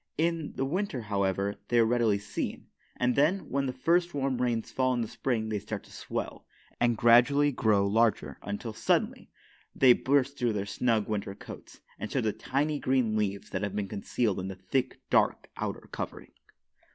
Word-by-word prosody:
In 165 -1 0
the 135 - -1
winter, 170 -3 -2
however, 100 -1 -1
they 120 - +1
are 115 - +6
readily 115 -3 +2
seen; 100 - -5 0.3
and, 125 0 +1
then, 160 +8 +2
when 140 0 0
the - - -1
first 170 +6 +1
warm 135 -3 -1
rains 120 -3 -1
fall 130 -1 +1
in 120 - 0
the 115 - -2
spring 110 -3 -2
they 105 -1 -1
start 105 +1 -6
to - - -18
swell, - - -5 0.3
and 120 -1 +2
gradually 125 +6 +5
grow 105 -6 +2
larger 110 +2 +1
until, 100 +3 -5
suddenly, - - 0 0.5
they 130 -2 +7
burst 140 +2 +1
through 120 -3 +1
their 100 -1 -2
snug 110 0 0
winter 100 -2 -3
coats, - - -11 0.2
and 110 - -5
show 135 - +1
the 110 -4 0
tiny, 145 +3 -1
green 130 -5 +1
leaves 100 -2 -2
that 95 - -2
have 100 -1 -3
been 105 -1 -1
concealed 100 +1 -1
in 95 - -4
the 95 - -5
thick, 95 +8 -2
dark, - - +2
outer - - -4
covering. - - -6
120 Hz, 185 wpm, -29 LUFS, 105-135 Hz, 0.5 s, they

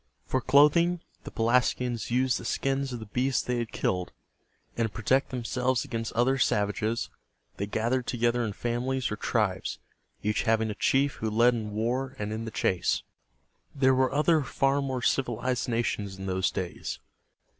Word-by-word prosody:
For 130 - 0
clothing, 150 +7 +4 0.2
the - - -5
Pelasgians 120 0 +1
used 125 0 +2
the - - -9
skins 135 0 -1
of 120 - -4
the 110 - -7
beasts 125 +5 0
they 125 -1 -1
had 115 -2 -3
killed; 90 -1 -1 0.6
and 115 -1 +1
to - - -11
protect 130 +6 +1
themselves 125 0 -1
against 115 -1 -3
other 125 +4 +2
savages, 105 +1 0 0.5
they 100 - -2
gathered 120 +4 0
together 120 0 +1
in 110 -3 -2
families 125 +3 -1
or - - -1
tribes, 105 -3 -1 0.5
each 105 +1 +1
having 110 -1 +1
a - - -3
chief 135 +5 +1
who 110 - -2
led 120 +3 +4
in 110 -3 -3
war 125 +5 -2
and 105 0 -3
in 110 +1 -4
the - - -4
chase. 95 -4 0 0.7
There 130 -1 +4
were 130 0 +2
other 155 +3 +3
far 135 0 +1
more 130 -3 -3
civilized 125 -2 0
nations 105 -4 -1
in 95 - -7
those 95 0 +1
days. 90 -2 -4
120 Hz, 165 wpm, -28 LUFS, 110-130 Hz, 0.7 s, clothing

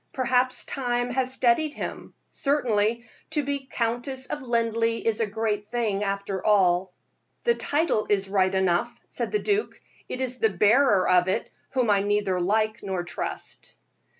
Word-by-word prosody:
Perhaps 255 0 +1
time 245 -2 -1
has 255 0 0
steadied 260 +4 +2
him. - - -6 0.2
Certainly, 235 -5 0 0.2
to 300 -2 0
be 280 -1 -3
Countess 245 +3 -2
of 295 - -5
Linleigh 230 -2 0
is 225 -2 +1
a 225 - +1
great 210 -1 -2
thing, 215 -4 -1
after 200 -1 -3
all." 185 -3 +3 0.5
"The 475 - +4
title 295 - 0
is 195 -1 +2
right 190 -1 +1
enough," 185 -2 +1
said - - -3
the 420 - +2
duke; 415 0 -1 0.3
"it 255 - -4
is 255 -1 -3
the 220 - +3
bearer 210 +2 +4
of 180 0 +4
it 190 +5 -1 0.2
whom 250 -5 +2
I 200 -1 +3
neither 205 -3 0
like 215 +4 +1
nor 190 -3 -3
trust." 170 -3 -7
225 Hz, 155 wpm, -26 LUFS, 200-255 Hz, 0.5 s, The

